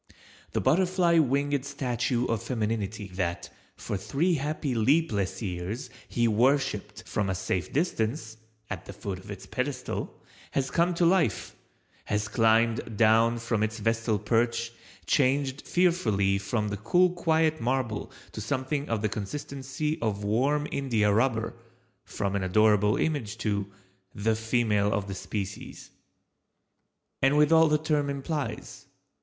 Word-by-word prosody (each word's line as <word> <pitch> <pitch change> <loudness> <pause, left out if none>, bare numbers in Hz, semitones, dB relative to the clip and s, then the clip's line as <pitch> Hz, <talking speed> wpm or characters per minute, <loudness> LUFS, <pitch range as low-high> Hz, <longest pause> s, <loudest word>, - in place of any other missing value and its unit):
The - - 0
butterfly 180 -1 +3
winged 140 -1 +1
statue 125 -3 -1
of 115 -4 -1
Femininity 110 -3 -2
that, 85 -2 -3 0.2
for 100 - -4
three 160 - 0
happy 150 -2 -2
leapless 110 - +1
years, 95 +6 -4 0.2
he 120 -1 +1
worshiped 125 0 +1
from 105 -2 -1
a 95 - 0
safe 90 0 -2
distance 115 -6 -1 0.3
(at 95 -4 -6
the - - -8
foot 95 -3 -5
of 95 - -14
its 100 -2 -7
pedestal), 130 -1 -4 0.3
has 135 -2 0
come 170 +1 +2
to 170 - +2
life, 170 - +1 0.5
has 105 0 -1
climbed 115 +1 +2
down 115 +2 +4
from 115 -2 -1
its 110 +1 -1
vestal 115 0 0
perch, 115 +2 0 0.3
changed 135 0 +1
fearfully 110 - +2
from 105 0 -2
cool 180 - +3
quiet 160 -2 +1
marble 120 -2 -1 0.2
to 110 - -6
something 135 +5 -2
of 110 -2 -1
the - - +3
consistency 135 +7 -4
of 105 -3 -1
warm 135 +8 +1
india 115 -7 +1
rubber—from 115 -3 -3
an 100 - 0
adorable 105 +2 +3
image 130 -9 -1
to—the 100 0 -3
female 110 -2 +1
of 100 -1 -1
the 100 - -4
species. 100 +1 -6 1.3
And 135 +2 +4
with 150 +1 +4
all 160 0 +7
the 150 0 +3
term 150 -2 0
implies. 140 +1 -4
115 Hz, 130 wpm, -28 LUFS, 105-140 Hz, 1.3 s, all